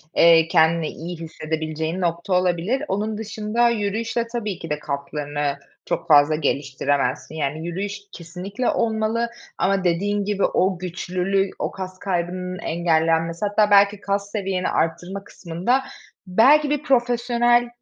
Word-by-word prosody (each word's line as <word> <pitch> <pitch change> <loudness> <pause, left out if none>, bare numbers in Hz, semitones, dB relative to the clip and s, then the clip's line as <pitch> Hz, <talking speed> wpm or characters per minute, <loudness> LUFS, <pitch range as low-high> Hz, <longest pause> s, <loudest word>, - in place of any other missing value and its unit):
eee, 165 -1 +6
kendini 160 0 +3
iyi 170 +2 -7
hissedebileceğin 160 +1 -4
nokta 170 +2 -1
olabilir. 180 - +1
Onun 210 +2 -2
dışında 220 +2 0
yürüyüşle 225 +2 -1
tabii 225 -5 -4
ki 165 - -7
de 150 0 -2
kaslarını 145 0 -3 0.3
çok - - -3
fazla 150 0 +6
geliştiremezsin. 140 -1 -1
Yani, 155 +2 -3
yürüyüş 200 +4 -4
kesinlikle 180 +8 -4
olmalı 225 +1 0 0.3
ama 195 -1 +1
dediğin 200 +4 0
gibi 205 -1 -1
o 185 0 +1
güçlülü, 185 +2 -1
o - - -2
kas 185 -1 -7
kaybının 180 0 -3
engellenmesi, 165 +1 +1
hatta 205 0 +2
belki 200 0 +5
kas 200 0 -2
seviyeni 190 -3 -1
arttırma 175 +4 -2
kısmında 190 +8 -1 0.5
belki 275 +11 +5
bir 295 0 -1
profesyonel 240 -1 +2
185 Hz, 130 wpm, -22 LUFS, 165-210 Hz, 0.5 s, eee